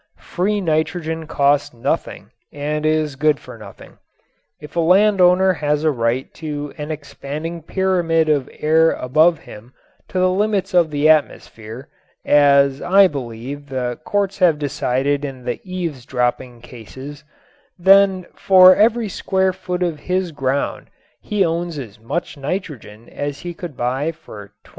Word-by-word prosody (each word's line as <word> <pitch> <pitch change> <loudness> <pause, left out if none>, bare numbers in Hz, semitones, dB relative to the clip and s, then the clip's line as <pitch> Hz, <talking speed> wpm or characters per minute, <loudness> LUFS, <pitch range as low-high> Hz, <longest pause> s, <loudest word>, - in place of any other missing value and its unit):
Free 205 +3 -2
nitrogen 160 -1 -2
costs 145 -2 +1
nothing 115 - -3 0.2
and 150 +1 -2
is 155 -2 0
good 150 +1 +1
for - - -12
nothing. - - -14 0.6
If 150 +1 -12
a - - 0
land 195 +4 +4
owner 185 +1 +4
has 150 -2 -1
a 155 - +3
right 120 0 -2
to 145 -2 -5
an 150 +1 -5
expanding 150 +2 -6
pyramid 170 -2 0
of 145 -4 0
air 160 +1 +2
above 155 +6 +2
him 115 +5 -14 0.3
to - - -6
the 185 0 +3
limits 200 0 -1
of 175 -3 +4
the 150 0 +1
atmosphere 130 -5 -1 0.4
as, 140 -1 +4
I 195 +1 +5
believe, 135 +1 -7
the 125 -2 -3
courts 200 -1 -1
have 175 -5 +4
decided 140 0 -1
in 135 -3 -6
the 125 - -4
eaves 175 -8 -5
dropping 125 -1 -2
cases 130 +5 -11 0.5
then 190 0 +4
for 185 -1 +6
every 225 +1 +2
square 190 -1 0
foot 180 0 -4
of 165 -4 -2
his 180 +1 -2
ground 135 -1 -2 0.3
he 205 -3 0
owns 170 0 -3
as 110 -6 -9
much 115 +8 -4
nitrogen 140 - -6
as 145 0 -5
he 175 0 -6
could 165 -5 -9
buy 130 +6 -1
for 105 -11 -13
$2500. - - -19
155 Hz, 150 wpm, -19 LUFS, 135-180 Hz, 0.6 s, for